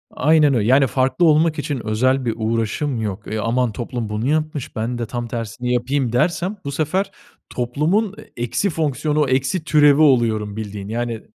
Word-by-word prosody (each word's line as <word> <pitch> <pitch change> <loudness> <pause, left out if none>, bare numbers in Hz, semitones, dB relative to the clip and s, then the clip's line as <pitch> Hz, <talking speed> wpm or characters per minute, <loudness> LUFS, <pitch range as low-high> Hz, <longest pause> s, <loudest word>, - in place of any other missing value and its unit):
Aynen 150 0 +4
öyle. 110 -4 +1
Yani, 135 +2 +5
farklı 130 +5 +1
olmak 155 0 +3
için 140 -6 -4
özel 130 +4 +1
bir 115 - 0
uğraşım 115 +4 -1
yok. 105 -1 -4
E, 110 - -1
aman 120 +2 0
toplum 120 0 -5
bunu 105 +3 -2
yapmış, 155 -3 -2
ben 120 +2 -2
de 120 - -3
tam 120 +1 -5
tersini 120 +1 -3
yapayım 125 0 0
dersem 175 +9 0
bu 140 - -3
sefer 185 +7 -1 0.4
toplumun, 155 - 0 0.2
e, 120 - -2
eksi 160 - 0
fonksiyonu, 150 -2 0
eksi 135 +6 0
türevi 150 -2 +5
oluyorum 115 -7 +2
bildiğin. 105 -2 -6
Yani, 115 0 -3
130 Hz, 170 wpm, -20 LUFS, 115-150 Hz, 0.4 s, Yani